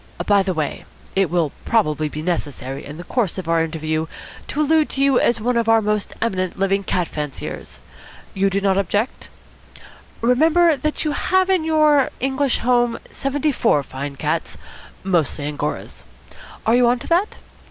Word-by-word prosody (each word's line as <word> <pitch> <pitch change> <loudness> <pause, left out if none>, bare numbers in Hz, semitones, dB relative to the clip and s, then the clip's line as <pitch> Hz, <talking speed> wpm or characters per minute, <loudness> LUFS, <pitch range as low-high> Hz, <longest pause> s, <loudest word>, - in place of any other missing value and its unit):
By 205 -1 +4
the 190 -2 -2
way, 155 -2 -3 0.3
it 195 -2 +2
will 165 -4 +1
probably 155 -9 +1
be 155 +1 -6
necessary 145 -6 -3
in 145 +2 -9
the 175 - -7
course 215 -3 -1
of 185 -3 -5
our 165 0 +2
interview 155 0 -2 0.4
to 290 - -4
allude 310 +1 +3
to 275 - -1
you 275 -2 +4
as 235 - +2
one 245 +3 0
of 230 -1 +1
our 225 0 +6
most 210 -1 -1
eminent 185 -5 -2
living 195 +1 +1
cat 180 -2 0
fanciers. 150 -2 -6 0.5
You 195 +1 +2
do 195 +1 0
not 195 -1 +2
object? 205 +6 -2 0.9
Remember 315 +7 +4
that 305 +3 -2
you 305 - +1
have 375 +5 +1
in 370 -4 +2
your 305 -3 +4
English 270 0 +1
home 240 -1 +2
seventy 290 +2 -1
four 225 - +2
fine 140 +1 -6
cats, - - -2 0.5
mostly 165 -6 0
Angoras. 150 0 -4 0.6
Are 225 - +4
you 245 -1 +4
on 245 +1 +3
to - - -10
that? 360 +5 +2
205 Hz, 170 wpm, -21 LUFS, 165-270 Hz, 0.9 s, our